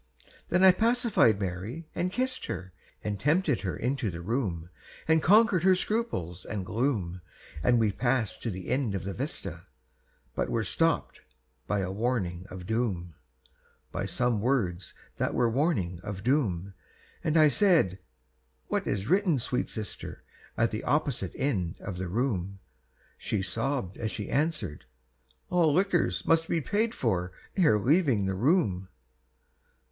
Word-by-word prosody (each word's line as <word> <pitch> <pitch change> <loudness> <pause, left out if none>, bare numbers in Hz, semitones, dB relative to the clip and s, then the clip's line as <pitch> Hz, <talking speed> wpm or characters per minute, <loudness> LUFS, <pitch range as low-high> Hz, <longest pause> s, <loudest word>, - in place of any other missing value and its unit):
Then 185 +2 +3
I 190 - +10
pacified 225 - +3
Mary 100 - -4
and 180 +1 -1
kissed 255 +4 -1
her, 95 -1 -5 0.3
And 105 -2 -3
tempted 150 - +2
her 95 -3 -3
into 125 -2 -1
the 85 -1 -6
room, 90 -6 -2 0.4
And 160 0 +4
conquered 205 0 +5
her 190 +2 +5
scruples 180 - -2
and 100 -3 -4
gloom; 100 -6 -1 0.4
And 120 +6 +4
we 110 -2 +3
passed 120 +2 0
to 115 - -2
the 95 -3 -6
end 130 -7 0
of 95 - -3
the 100 +1 -4
vista, - - -5 0.7
But - - -1
were 115 - 0
stopped 165 +7 0 0.5
by 100 -1 0
the 95 -1 -2
warning 95 -5 -1
of 90 -1 -8
doom, 100 -6 -1 0.8
By - - -3
some 120 -4 0
words 100 -8 0 0.2
that - - -1
were 120 - +3
warning 110 - 0
of 95 0 -6
doom. 100 - 0 0.5
And 155 +1 +2
I 155 -1 +7
said, 155 - +3 0.7
"What - - -1
is 100 -1 -1
written, 185 -3 +3
sweet 125 0 -1
sister, 110 -2 -6 0.3
At 115 -1 +2
the 110 - -4
opposite 140 - 0
end 95 - -1
of 90 -2 -6
the 95 - -3
room?" 100 -3 -1 0.6
She 100 -3 -1
sobbed, 100 0 -2
as 110 - -2
she 105 -1 -5
answered, 135 - -1 0.7
"All 170 -3 +4
liquors 170 - +1
Must 165 0 +3
be 165 - +2
paid 215 +8 0
for 90 -7 0 0.2
ere 160 - +4
leaving 130 - +3
the 95 - 0
room." 100 - +1
115 Hz, 150 wpm, -28 LUFS, 95-160 Hz, 0.8 s, I